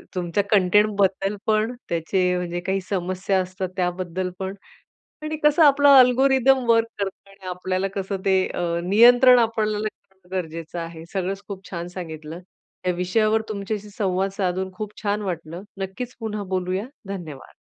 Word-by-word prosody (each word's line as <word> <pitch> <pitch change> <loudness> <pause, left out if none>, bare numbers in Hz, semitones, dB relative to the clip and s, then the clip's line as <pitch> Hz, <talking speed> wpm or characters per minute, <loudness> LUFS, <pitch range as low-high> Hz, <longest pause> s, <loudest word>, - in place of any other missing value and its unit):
तुमच्या 180 +2 0
कंटेंटबद्दल 200 0 +3
पण, 220 +3 +1
त्याचे 180 +2 +1
म्हणजे 175 0 -3
काही 190 0 0
समस्या 185 0 0
असतात 185 0 -4
त्याबद्दल 180 0 -2
पण. 190 0 -3 0.7
आणि 310 0 -3
कसं 300 +2 +5
आपला 285 -1 +7
अल्गोरिदम 265 +1 +4
वर्क 230 0 +4
करतो 195 0 -5
आणि 195 -1 -13
आपल्याला 185 +1 -2
कसं 195 0 -2
ते 190 -1 +4
अ, - - -4 0.2
नियंत्रण 245 +6 +7
आपल्याला 215 -2 0
करणं 190 -3 -9
गरजेचं 165 0 -5
आहे, 165 -1 -7
सगळंच 195 +1 -2
खूप 195 -2 -8
छान 170 -1 -4
सांगितलं. 160 -1 -7 0.5
या - - +4
विषयावर 215 +5 +2
तुमच्याशी 210 0 -4
संवाद 195 -2 -1
साधून 190 -1 -2
खूप 210 +1 -6
छान 205 0 0
वाटलं, 170 -2 -5 0.2
नक्कीच 215 +6 -5
पुन्हा 215 -2 -4
बोलूया. 185 +4 -2 0.2
धन्यवाद. 165 -8 -8
195 Hz, 145 wpm, -23 LUFS, 180-215 Hz, 0.7 s, आपला